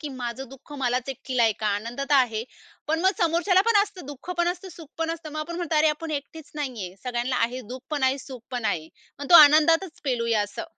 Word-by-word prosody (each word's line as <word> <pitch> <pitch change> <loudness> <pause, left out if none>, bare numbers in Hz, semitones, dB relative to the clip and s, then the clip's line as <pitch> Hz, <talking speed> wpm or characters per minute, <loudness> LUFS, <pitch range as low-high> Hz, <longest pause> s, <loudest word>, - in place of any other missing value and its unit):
की 300 - -5
माझं 245 +2 -5
दुःख 270 +3 -14
मलाच 250 0 0
एकटीला 255 -2 0
ऐका. 215 - -4
आनंद 230 +5 -5
तर 275 +1 +1
आहे. 240 -5 +3 0.5
पण 320 +1 +1
मग 380 +2 +4
समोरच्याला 345 +3 +3
पण 450 - +4
असतं 400 -7 -8
दुःख 290 +4 -9
पण 345 0 +3
असतं 360 +2 -4
सुख 330 -3 -12
पण 325 0 -1
असतं. 325 -2 -6
मग 310 - -3
आपण 340 +2 -5
म्हणतो 340 -3 -1
अरे 310 +1 +5
आपण 310 +2 -3
एकटेच 295 +2 -13
नाहीये. 245 -11 -5
सगळ्यांना 245 +1 -1
आहे 250 +2 -4
दुःख 260 - -9
पण 295 -3 -2
आहे, 260 +1 +2
सुख 260 -2 -9
पण 245 -3 -4
आहे. 160 -6 -1 0.3
मग 285 -1 -7
तो - - +7
आनंदातच 315 +4 +4
पेलूया 230 -5 +1
असं. 205 0 -6
280 Hz, 225 wpm, -25 LUFS, 245-325 Hz, 0.5 s, तो